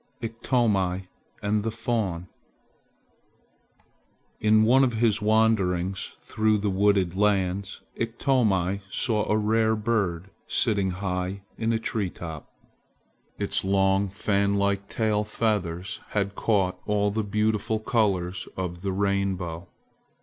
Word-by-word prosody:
IKTOMI 110 -5 0 0.4
AND 105 +1 +1
THE 115 - -1
FAWN 110 -7 -2 2.1
IN 110 0 +4
one 130 +5 +5
of 125 -3 +2
his 110 -1 +2
wanderings 100 -4 +1
through 110 0 +1
the 100 0 -1
wooded 95 -2 +2
lands, 100 -1 0
Iktomi 110 -6 +1
saw 105 +1 0
a 105 - +3
rare 110 +1 +2
bird 100 -5 -1 0.2
sitting 100 -5 +1
high 90 +1 -3
in 115 0 -1
a 115 - +2
tree 110 -3 -2
top. 80 -4 -8 0.9
Its - - -1
long 95 0 +2
fan 100 +1 +1
like 100 0 0
tail 110 -2 +1
feathers 100 -5 -2
had 100 -1 -1
caught 95 -3 +1
all 105 -1 +1
the 110 +1 -1
beautiful 105 +1 0
colors 95 -5 0
of 90 -2 -4
the 100 0 -2
rainbow. 95 -3 -1
100 Hz, 115 wpm, -26 LUFS, 95-110 Hz, 2.1 s, one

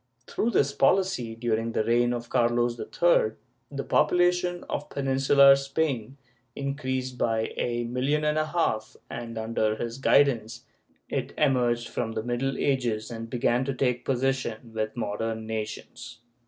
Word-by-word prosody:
Through 230 - -1
this 140 -11 +2
policy 140 -6 +1
during 115 0 -1
the - - +1
reign 120 +2 +2
of 120 -1 -4
Carlos 120 0 +1
III, - - +2 0.4
the - - -4
population 175 0 +2
of 150 - -4
Peninsular 135 0 +5
Spain 135 -3 -2 0.4
increased 130 -2 -3
by 115 -1 0
a 120 0 -1
million 130 +6 0
and 150 0 +1
a 155 - 0
half 155 -10 -1
and, 115 -1 -6
under 110 -1 0
his 115 +3 -5
guidance 125 -6 +2 0.4
it - - -3
emerged 120 -5 +2
from 115 - -3
the 110 - -3
Middle 125 +3 -1
Ages 120 -5 0
and 115 0 -6
began 120 +1 +1
to 135 0 -3
take 125 -2 0
position 125 -3 -2
with 110 +1 -3
modern 110 0 -3
nations. 110 -1 -6
125 Hz, 140 wpm, -27 LUFS, 115-140 Hz, 0.4 s, Peninsular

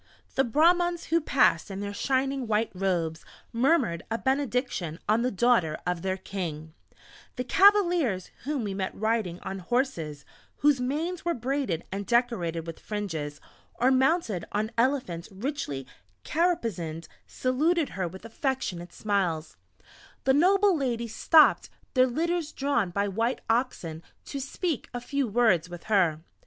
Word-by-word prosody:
The 270 - +3
Brahmans 345 +6 +2
who 335 0 +4
passed 250 - +3
in 195 0 -5
their 200 0 -4
shining 270 +2 0
white 220 +1 +1
robes, 175 -4 -1 0.3
murmured 235 - +2
a 225 - 0
benediction 250 - -1
on 215 +2 +3
the 250 - +1
daughter 205 -8 +2
of 180 -1 -1
their 190 +1 -1
king; 160 -6 -5 0.6
the 250 - -2
cavaliers 350 - +4
whom 285 -3 -2
we 200 -2 -3
met 190 -1 -3
riding 215 -5 -1
on 195 0 -5
horses 180 - -2 0.3
whose 285 -3 +3
manes 320 +7 -2
were 340 0 0
braided 250 - -2
and 200 +1 -4
decorated 210 -10 +1
with 165 -1 -7
fringes, 165 -9 -4 0.4
or 255 +2 +3
mounted 265 - +2
on 215 +2 -1
elephants 230 -9 0
richly 195 - -4 0.4
caparisoned, 225 - -1 0.2
saluted 300 +5 +1
her 185 -2 -3
with 190 +5 -10
affectionate 225 - -3
smiles; 180 - -1 0.7
the 265 - +4
noble 385 +6 +4
ladies 235 -6 -2
stopped 315 -2 +5 0.2
their 255 -1 +5
litters 330 +4 -1
drawn 265 -8 0
by 200 +3 0
white 230 +6 -1
oxen 205 -10 -1 0.2
to 280 - -5
speak 285 +2 -3
a - - -1
few 275 +2 -1
words 205 -7 +2
with 175 -1 -9
her. 175 -7 +2
230 Hz, 140 wpm, -27 LUFS, 185-275 Hz, 0.7 s, stopped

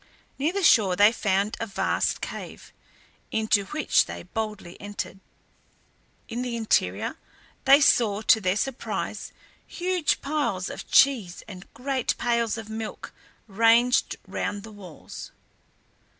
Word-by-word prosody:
Near 300 +5 +1
the 395 +1 -2
shore 205 - +5
they 205 +3 +6
found 200 -2 0
a 230 - -3
vast 200 - -1
cave, - - -8 0.6
into 220 -2 +1
which 305 +8 +2
they - - -7
boldly 215 -6 -5
entered. 205 -2 -6 1.1
In 235 +2 -4
the 245 -2 -3
interior 225 -2 0 0.5
they 275 +1 +8
saw 220 -6 +3
to 220 0 +5
their 185 0 +1
surprise 265 +4 -3 0.4
huge 360 -3 0
piles 280 -11 -2
of - - -9
cheese 230 -10 +3
and 185 -2 -11
great 260 +1 -1
pails 235 -2 0
of 225 -2 -7
milk 220 0 -6 0.3
ranged 230 +4 +3
round 205 -1 -4
the 220 - -10
walls. 190 -6 -10
225 Hz, 125 wpm, -25 LUFS, 205-250 Hz, 1.1 s, they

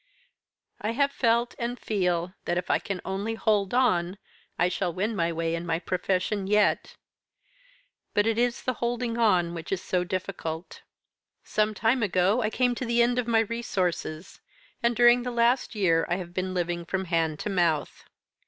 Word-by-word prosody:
I 220 +2 -1
have 280 +3 +2
felt, 235 -1 +1
and 240 +1 -3
feel, 180 -4 -1
that 175 - 0
if 180 - -1
I - - +3
can 195 -3 -5
only 200 +4 -2
hold 210 -3 +1
on, 185 -7 +2 0.4
I 175 - +3
shall 180 0 -1
win 205 +6 -2
my 170 -3 +1
way 165 0 -1
in 170 0 -2
my 165 -2 0
profession 185 +2 -1
yet. 210 +1 +2 1.2
But 205 - +3
it 225 0 +1
is 240 0 0
the 255 - 0
holding 235 0 -1
on 180 -7 +3
which 165 -1 -7
is 195 - 0
so 180 -1 0
difficult. 175 -2 -5 0.6
Some 215 0 0
time 235 +4 +2
ago 195 +3 +2
I 215 - +1
came 245 +2 +1
to 250 - -4
the 235 0 +3
end 245 +1 +1
of 245 - -2
my 225 -1 +4
resources, 190 -7 -3 0.4
and 235 0 +2
during 240 +1 +6
the 250 - -3
last 240 +1 +1
year 165 -5 +2
I 175 - +2
have 175 -2 -7
been 185 0 -2
living 175 -1 -1
from 190 +3 -2
hand 165 -3 0
to 210 - -3
mouth. 170 -5 0
195 Hz, 180 wpm, -27 LUFS, 175-235 Hz, 1.2 s, during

